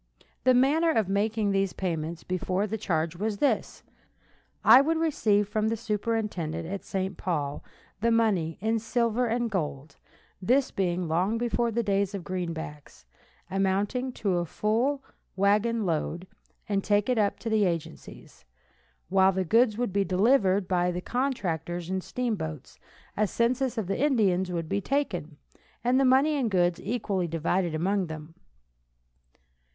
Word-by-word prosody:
The 255 Hz, -1 st, +6 dB
manner 295 Hz, +7 st, +3 dB
of 220 Hz, -, +2 dB
making 205 Hz, +1 st, 0 dB
these 195 Hz, -1 st, 0 dB
payments 165 Hz, -2 st, -3 dB
before 185 Hz, +2 st, -1 dB
the 215 Hz, +1 st, -3 dB
change 170 Hz, -6 st, -1 dB
was 210 Hz, +3 st, -2 dB
this: 285 Hz, -, 0 dB, 0.8 s
I -, -, +9 dB
would 320 Hz, +3 st, +1 dB
receive 220 Hz, -11 st, +2 dB
from 215 Hz, +1 st, 0 dB
the 225 Hz, +1 st, 0 dB
superintendent, 210 Hz, -7 st, -2 dB
at 195 Hz, +2 st, -5 dB
St. 190 Hz, 0 st, -3 dB
Paul, 145 Hz, -6 st, -2 dB, 0.4 s
the 230 Hz, +3 st, +2 dB
money, 210 Hz, -8 st, +1 dB
in 225 Hz, +2 st, +1 dB
silver 235 Hz, +1 st, 0 dB
and 235 Hz, 0 st, -1 dB
gold 150 Hz, -5 st, -4 dB, 0.4 s
(this 255 Hz, +8 st, +2 dB
being 180 Hz, -2 st, -1 dB
long 180 Hz, +8 st, +1 dB
before 240 Hz, 0 st, 0 dB
the 235 Hz, +1 st, -1 dB
days 200 Hz, -1 st, 0 dB
of 190 Hz, -, -5 dB
greenbacks), 165 Hz, -, -6 dB, 0.5 s
amounting 200 Hz, +7 st, 0 dB
to 190 Hz, -6 st, 0 dB
a 175 Hz, -, -1 dB
full 240 Hz, -, 0 dB, 0.3 s
wagon 210 Hz, +3 st, +2 dB
load, 170 Hz, +1 st, -2 dB, 0.4 s
and 200 Hz, -2 st, 0 dB
take 205 Hz, -1 st, +2 dB
it 250 Hz, -3 st, +1 dB
up 205 Hz, -1 st, +1 dB
to 225 Hz, -, -5 dB
the 215 Hz, -2 st, +3 dB
agencies, 165 Hz, -, -6 dB, 0.7 s
while 190 Hz, 0 st, +5 dB
the 190 Hz, 0 st, -1 dB
goods 225 Hz, +3 st, +3 dB
would 240 Hz, -6 st, -2 dB
be 200 Hz, 0 st, +2 dB
delivered 195 Hz, -1 st, +2 dB
by 180 Hz, -1 st, +1 dB
the 180 Hz, 0 st, -2 dB
contractors 180 Hz, -, -2 dB
in 190 Hz, 0 st, -1 dB
steamboats, 165 Hz, -, -4 dB, 0.4 s
a 215 Hz, 0 st, +2 dB
census 250 Hz, +4 st, 0 dB
of 220 Hz, -, -1 dB
the 195 Hz, +6 st, -2 dB
Indians 195 Hz, -10 st, +2 dB
would 165 Hz, -2 st, -3 dB
be 200 Hz, +4 st, -1 dB
taken, 185 Hz, -, -2 dB, 0.5 s
and 250 Hz, +2 st, +3 dB
the 270 Hz, -, +4 dB
money 270 Hz, +4 st, +4 dB
and 250 Hz, -5 st, 0 dB
goods 175 Hz, -3 st, +1 dB
equally 205 Hz, -5 st, -2 dB
divided 165 Hz, +1 st, -1 dB
among 190 Hz, +3 st, 0 dB
them. 155 Hz, 0 st, -8 dB
200 Hz, 150 wpm, -27 LUFS, 175-230 Hz, 0.8 s, I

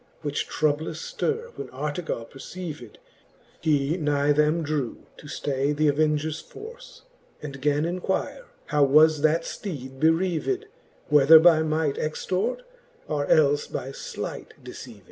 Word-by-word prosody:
Which 145 Hz, -1 st, -2 dB
troublous 155 Hz, +1 st, -1 dB
ftirre 470 Hz, 0 st, -2 dB
when -, -, -7 dB
Artegall 145 Hz, -2 st, -4 dB
perceived. 145 Hz, -, -9 dB, 0.6 s
He 150 Hz, +1 st, +1 dB
nigh 145 Hz, -3 st, +1 dB
them 150 Hz, +3 st, +2 dB
drew 145 Hz, -5 st, -3 dB
to -, -, -12 dB
ftay 140 Hz, 0 st, -1 dB
th'avengers 155 Hz, +1 st, +1 dB
forle, 465 Hz, +3 st, -11 dB, 0.6 s
And 140 Hz, -2 st, -7 dB
gan 145 Hz, +2 st, +1 dB
inquire, 185 Hz, -, -2 dB, 0.2 s
how 145 Hz, -, +2 dB
was 155 Hz, +2 st, +5 dB
that 155 Hz, +2 st, +3 dB
fteed 135 Hz, -11 st, -7 dB
bereaved, 175 Hz, -, +1 dB, 0.4 s
Whether 150 Hz, +2 st, +8 dB
by 160 Hz, -1 st, +6 dB
might 155 Hz, -2 st, 0 dB
extort, 185 Hz, -, -2 dB, 0.4 s
or 145 Hz, -2 st, -1 dB
elfe 145 Hz, -1 st, +3 dB
by 135 Hz, -, -4 dB
flight -, -, -7 dB
deceaved. -, -, -10 dB
155 Hz, 125 wpm, -25 LUFS, 145-165 Hz, 0.6 s, Whether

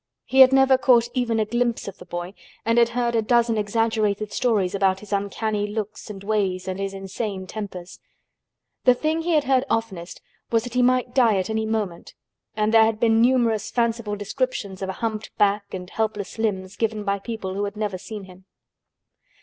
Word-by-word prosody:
He 265 Hz, -, +1 dB
had 260 Hz, 0 st, +10 dB
never 265 Hz, -1 st, +5 dB
caught 240 Hz, -3 st, +4 dB
even 235 Hz, -3 st, 0 dB
a 215 Hz, -, +2 dB
glimpse 240 Hz, +1 st, -1 dB
of 200 Hz, -, -8 dB
the 180 Hz, -, -12 dB
boy 175 Hz, +2 st, -5 dB, 0.3 s
and 230 Hz, +1 st, +3 dB
had 235 Hz, 0 st, +4 dB
heard 240 Hz, -1 st, +1 dB
a 225 Hz, -, +2 dB
dozen 235 Hz, +1 st, +2 dB
exaggerated 215 Hz, -1 st, 0 dB
stories 205 Hz, -6 st, +1 dB
about 195 Hz, -1 st, +1 dB
his 210 Hz, -1 st, -7 dB
uncanny 205 Hz, +1 st, -1 dB
looks 215 Hz, +1 st, -5 dB
and 195 Hz, -2 st, -8 dB
ways 195 Hz, -3 st, -1 dB
and 190 Hz, 0 st, -3 dB
his 195 Hz, 0 st, -3 dB
insane 195 Hz, 0 st, -4 dB
tempers. 185 Hz, -4 st, -7 dB, 0.9 s
The 250 Hz, -1 st, +6 dB
thing 315 Hz, +5 st, -1 dB
he 340 Hz, +1 st, 0 dB
had 305 Hz, -2 st, +3 dB
heard 260 Hz, -1 st, +2 dB
oftenest 200 Hz, -7 st, -3 dB, 0.3 s
was 230 Hz, -1 st, +2 dB
that 245 Hz, -1 st, -7 dB
he 250 Hz, -, +2 dB
might 250 Hz, 0 st, +2 dB
die 230 Hz, -6 st, +4 dB
at 190 Hz, +3 st, -2 dB
any 220 Hz, 0 st, -1 dB
moment 210 Hz, -6 st, -3 dB, 0.4 s
and 215 Hz, +1 st, +1 dB
there 225 Hz, -1 st, +8 dB
had 220 Hz, -1 st, -1 dB
been 225 Hz, -1 st, +4 dB
numerous 230 Hz, -3 st, +2 dB
fanciful 230 Hz, -3 st, -1 dB
descriptions 205 Hz, -2 st, -3 dB
of 190 Hz, -, -3 dB
a -, -, -2 dB
humped 220 Hz, -1 st, -4 dB
back 200 Hz, -1 st, +1 dB
and 180 Hz, -1 st, -6 dB
helpless 215 Hz, 0 st, -3 dB
limbs, 195 Hz, -3 st, -2 dB
given 220 Hz, -2 st, -1 dB
by 200 Hz, 0 st, -1 dB
people 200 Hz, -3 st, -5 dB
who 200 Hz, +1 st, -1 dB
had 200 Hz, +1 st, -6 dB
never 205 Hz, -3 st, -2 dB
seen 210 Hz, +1 st, -8 dB
him. 185 Hz, 0 st, -15 dB
215 Hz, 195 wpm, -23 LUFS, 195-235 Hz, 0.9 s, had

